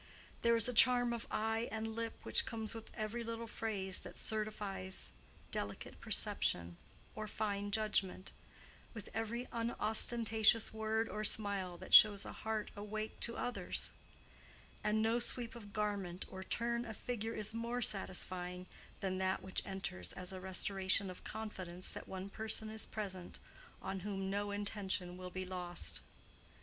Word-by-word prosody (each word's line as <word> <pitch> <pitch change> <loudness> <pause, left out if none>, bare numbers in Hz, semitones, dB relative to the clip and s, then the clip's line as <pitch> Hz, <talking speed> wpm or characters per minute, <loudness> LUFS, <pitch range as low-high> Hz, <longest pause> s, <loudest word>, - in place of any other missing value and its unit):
There 235 0 +5
is 230 0 +6
a 250 - 0
charm 245 +1 +6
of 235 - -4
eye 225 +2 0
and 220 0 -3
lip 230 0 -2
which - - +1
comes 220 -1 -2
with 225 -1 -7
every 220 +2 -2
little 230 0 -4
phrase 205 -4 -1
that - - -9
certifies 205 -3 -3 0.4
delicate 100 0 -4
perception 85 0 +2 0.4
or 215 0 -4
fine 205 -1 -2
judgment, 200 -3 0 0.6
with 215 - -7
every 230 +2 -2
unostentatious 225 -1 +3
word 220 +1 0
or 215 -1 -3
smile 200 -4 +1
that - - -8
shows 205 -2 +9
a - - -5
heart 220 -1 -3
awake 215 +1 -4
to 235 - +1
others; 245 - 0 0.9
and 215 +1 +2
no 225 +2 +3
sweep 240 0 +1
of 215 -4 -10
garment 200 -4 -2
or 190 0 -6
turn 235 +4 -1
of 220 -3 -7
figure 225 -2 -3
is 215 +1 0
more 235 +2 -1
satisfying 180 -2 +1 0.4
than 185 -1 -1
that 190 0 0
which 190 - -1
enters 140 - -1
as 180 +1 -2
a 185 - -6
restoration 190 0 +2
of 180 - -11
confidence 185 -5 -5
that - - -7
one 190 0 -5
person 220 +1 0
is 220 0 0
present 190 -4 -5 0.5
on 190 0 -2
whom 195 0 -3
no 205 +1 -1
intention 200 -3 -2
will 180 0 -6
be 185 +1 -4
lost. 180 -1 +1
210 Hz, 150 wpm, -37 LUFS, 190-225 Hz, 0.9 s, shows